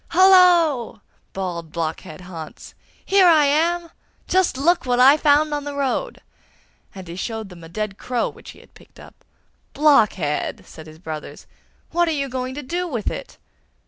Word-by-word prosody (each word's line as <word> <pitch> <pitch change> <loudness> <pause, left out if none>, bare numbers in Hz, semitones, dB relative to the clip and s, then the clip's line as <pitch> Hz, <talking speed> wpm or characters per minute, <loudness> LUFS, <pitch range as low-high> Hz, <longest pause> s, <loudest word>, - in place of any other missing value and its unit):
'Hullo!' 345 - +4 0.3
bawled 175 -4 -5
Blockhead 160 -1 -5
Hans, 170 -4 -10 0.3
'here 385 -2 +4
I 315 -4 +5
am! 335 +4 0 0.4
Just 370 -7 +1
look 340 +6 +2
what 245 -1 0
I 270 +3 +7
found 300 0 +2
on 290 -1 -3
the 290 0 -6
road!' 280 - -2 0.7
and 190 -2 -10
he 170 - -8
showed 220 +2 -5
them 175 -2 -13
a 165 - -11
dead 205 +2 -5
crow 245 -2 -2
which - - -12
he - - -13
had - - -23
picked - - -20
up. - - -16 0.5
'Blockhead!' 210 - +1
said 160 0 -13
his 155 0 -13
brothers, 160 -2 -8 0.5
'what 345 +1 +1
are 320 -2 -1
you 275 -1 -3
going 255 0 -4
to 295 - -6
do 350 +7 -3
with 235 -10 -3
it? - - -8
260 Hz, 170 wpm, -21 LUFS, -, 0.7 s, I